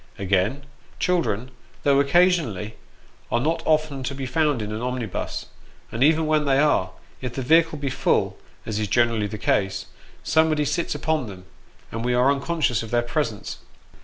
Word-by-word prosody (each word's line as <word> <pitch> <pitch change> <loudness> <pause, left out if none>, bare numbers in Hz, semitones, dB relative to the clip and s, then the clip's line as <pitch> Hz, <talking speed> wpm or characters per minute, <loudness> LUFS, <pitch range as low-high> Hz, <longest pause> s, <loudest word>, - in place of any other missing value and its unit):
Again; 100 +8 0 0.3
children, 130 - 0 0.3
though 140 -1 +4
occasionally, 140 - +2 0.6
are 120 - +2
not 165 +5 0
often 155 -3 +1
to 140 - -3
be 135 0 -4
found 145 0 +1
in 105 - -5
an 110 +1 -4
omnibus; 125 -5 -3 0.5
and 115 - 0
even 160 +2 +4
when 155 -1 +2
they 135 -1 +3
are, 140 -11 +3 0.3
if 125 -2 -5
the 130 - -2
vehicle 160 +3 +4
be 140 -2 -3
full, - - +1 0.3
as 110 -1 -2
is 105 - -1
generally 115 0 +2
the 105 - -6
case, 95 -1 0 0.4
somebody 160 -2 +2
sits 150 +4 -1
upon 155 -6 -1
them, 95 -3 -10 0.5
and 115 +1 -4
we 125 0 +1
are 125 +3 +4
unconscious 140 -4 0
of 115 - -7
their 120 +1 +1
presence. 120 -3 -3
130 Hz, 165 wpm, -24 LUFS, 115-155 Hz, 0.6 s, though